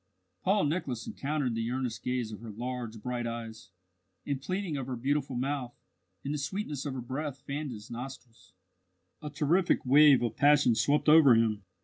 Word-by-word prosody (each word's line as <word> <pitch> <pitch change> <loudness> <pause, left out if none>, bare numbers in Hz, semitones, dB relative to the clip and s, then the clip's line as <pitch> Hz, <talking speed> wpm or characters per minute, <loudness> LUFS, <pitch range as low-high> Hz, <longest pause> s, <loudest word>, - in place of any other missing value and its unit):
Paul 195 +2 +2
Nicholas 145 -6 -2
encountered 140 -3 -2
the 115 0 -2
earnest 125 -3 -3
gaze 125 -3 -2
of 105 - -8
her 115 - -8
large, 120 0 -5
bright 125 -1 -2
eyes, 115 -4 -7 0.5
the 145 - -2
pleading 180 +5 -3
of 135 -2 -4
her 130 - -3
beautiful 135 +2 -1
mouth, 130 -1 -3 0.5
and 140 - -2
the 150 - -2
sweetness 145 -1 -3
of 135 - -4
her 130 - -4
breath 135 +3 -5
fanned 145 +1 -4
his 110 -2 -9
nostrils. 120 -1 -9 0.7
A 150 - -5
terrific 155 +5 +1
wave 140 0 +6
of 115 -2 -2
passion 145 -4 +5
swept 140 +8 +1
over 150 -5 +8
him. 110 -2 +1
130 Hz, 170 wpm, -30 LUFS, 120-145 Hz, 0.7 s, over